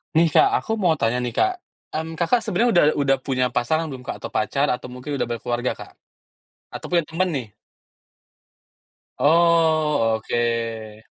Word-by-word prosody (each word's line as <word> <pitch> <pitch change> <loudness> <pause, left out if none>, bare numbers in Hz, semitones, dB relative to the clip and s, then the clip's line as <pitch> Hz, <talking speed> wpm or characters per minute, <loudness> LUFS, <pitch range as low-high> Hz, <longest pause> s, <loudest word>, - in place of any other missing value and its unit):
Nih 165 +1 +5
Kak, 390 - +6 0.2
aku - - -5
mau 165 -3 +4
tanya 115 -3 0
nih 120 - -2
Kak. 375 - +3 0.4
Kan, 160 +1 -3
Kakak 175 +8 +2
sebenernya 230 +7 +1
udah 175 - +5 0.2
udah 135 -1 +2
punya 130 -2 +1
pasangan 155 +7 +1
belum 130 - -7
Kak - - -3
atau - - -6
pacar 140 +6 0
atau 125 0 -4
mungkin 125 +4 -8
udah - - -1
berkeluarga 120 +1 -2
Kak? - - -10 0.8
Atau - - -6
punya 170 -3 +1
temen 180 +4 -1
nih? 130 -4 -3 1.7
Oh, 155 -6 +3
oke. 115 -2 -3
140 Hz, 155 wpm, -22 LUFS, 120-165 Hz, 1.7 s, Kak